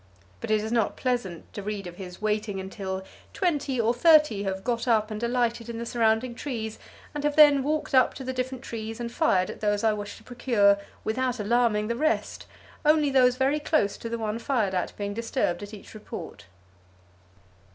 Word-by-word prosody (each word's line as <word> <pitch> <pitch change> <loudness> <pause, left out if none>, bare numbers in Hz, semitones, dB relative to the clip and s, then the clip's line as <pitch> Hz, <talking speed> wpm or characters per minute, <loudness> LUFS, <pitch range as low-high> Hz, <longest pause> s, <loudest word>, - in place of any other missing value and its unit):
But - - -6
it 215 -1 +3
is 220 - -4
not 230 -3 +1
pleasant 240 -10 -3
to 205 - -5
read 205 -1 -4
of 175 0 -9
his 180 -2 -8
waiting 210 -2 -1
until 190 0 -5 0.3
"twenty 290 -8 0
or 230 +1 +3
thirty 300 -7 +5
have 190 -1 -3
got 235 0 -1
up 220 -2 +2
and 215 0 -4
alighted 235 -1 0
in 230 - -5
the 235 - -4
surrounding 230 +1 +1
trees, 230 -4 -5 0.3
and 295 -1 -4
have 295 0 +1
then 295 -3 +7
walked 300 +2 -2
up 255 -1 +4
to 270 - -7
the 260 0 -3
different 255 0 -3
trees 225 -1 -6
and 235 -1 -4
fired 190 - +2
at - - -11
those 205 0 0
I 220 -1 +4
wished 205 -1 -6
to - - -17
procure 215 -5 +3 0.2
without 250 +2 -1
alarming 215 -1 +2
the 235 - -1
rest, 310 +6 -1 0.4
only 300 -1 +4
those 250 -2 +5
very 270 +3 +1
close 295 -10 +1
to 230 - -6
the 235 - -2
one 220 0 -3
fired 230 -7 0
at 180 - -2
being 205 0 -3
disturbed 230 -4 -1
at 205 0 -8
each 210 -3 -11
report." 215 -1 -9
230 Hz, 195 wpm, -26 LUFS, 210-255 Hz, 0.4 s, then